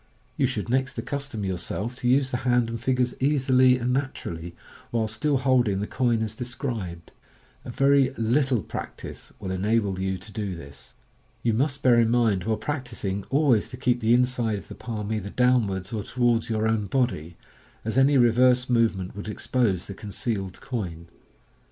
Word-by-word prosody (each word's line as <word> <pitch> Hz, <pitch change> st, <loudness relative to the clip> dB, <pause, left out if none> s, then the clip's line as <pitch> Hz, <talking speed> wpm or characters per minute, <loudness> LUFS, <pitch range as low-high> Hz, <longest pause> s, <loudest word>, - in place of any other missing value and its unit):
You 135 Hz, -, +2 dB
should 115 Hz, -5 st, -3 dB
next 130 Hz, +2 st, 0 dB
accustom 140 Hz, -7 st, -4 dB
yourself 95 Hz, +5 st, -3 dB
to 125 Hz, -2 st, 0 dB
use 130 Hz, +1 st, +3 dB
the 125 Hz, -, 0 dB
hand 120 Hz, -2 st, +1 dB
and 115 Hz, -1 st, -5 dB
fingers 125 Hz, -1 st, +1 dB
easily 130 Hz, -2 st, +4 dB
and 125 Hz, 0 st, -1 dB
naturally, 85 Hz, -11 st, -4 dB, 0.3 s
while 115 Hz, -2 st, 0 dB
still 135 Hz, +7 st, 0 dB
holding 125 Hz, -6 st, +2 dB
the 105 Hz, -, -1 dB
coin 120 Hz, -1 st, +1 dB
as 110 Hz, -1 st, -4 dB
described. 115 Hz, -, -5 dB, 0.5 s
A -, -, -7 dB
very 135 Hz, +1 st, +4 dB
little 120 Hz, 0 st, +1 dB
practice -, -, -7 dB
will 95 Hz, -, -4 dB
enable 100 Hz, 0 st, 0 dB
you 95 Hz, 0 st, -1 dB
to 100 Hz, +4 st, -12 dB
do 105 Hz, -4 st, -3 dB
this. 70 Hz, -5 st, -12 dB, 0.5 s
You 115 Hz, -, +2 dB
must 140 Hz, +4 st, 0 dB
bear 120 Hz, -2 st, +6 dB
in 115 Hz, -1 st, +4 dB
mind 115 Hz, -6 st, +2 dB
while 110 Hz, -1 st, 0 dB
practising 110 Hz, -6 st, -3 dB
always 135 Hz, -6 st, +3 dB
to 125 Hz, -, -8 dB
keep 125 Hz, -1 st, +1 dB
the 115 Hz, 0 st, +4 dB
inside 125 Hz, -3 st, +1 dB
of 100 Hz, -, -11 dB
the -, -, -7 dB
palm 110 Hz, -2 st, -4 dB
either 105 Hz, -2 st, -3 dB
downwards 110 Hz, -6 st, +1 dB
or 110 Hz, -, -1 dB
towards 120 Hz, +1 st, +1 dB
your 110 Hz, -1 st, +1 dB
own 110 Hz, -2 st, 0 dB
body, 110 Hz, -, -1 dB, 0.5 s
as 110 Hz, -, -2 dB
any 135 Hz, +2 st, +5 dB
reverse 125 Hz, +1 st, +4 dB
movement 110 Hz, -7 st, +1 dB
would 100 Hz, +1 st, -6 dB
expose 105 Hz, -4 st, 0 dB
the 100 Hz, -, -7 dB
concealed 100 Hz, -2 st, -4 dB
coin. 85 Hz, -10 st, -5 dB
115 Hz, 170 wpm, -25 LUFS, 100-130 Hz, 0.5 s, bear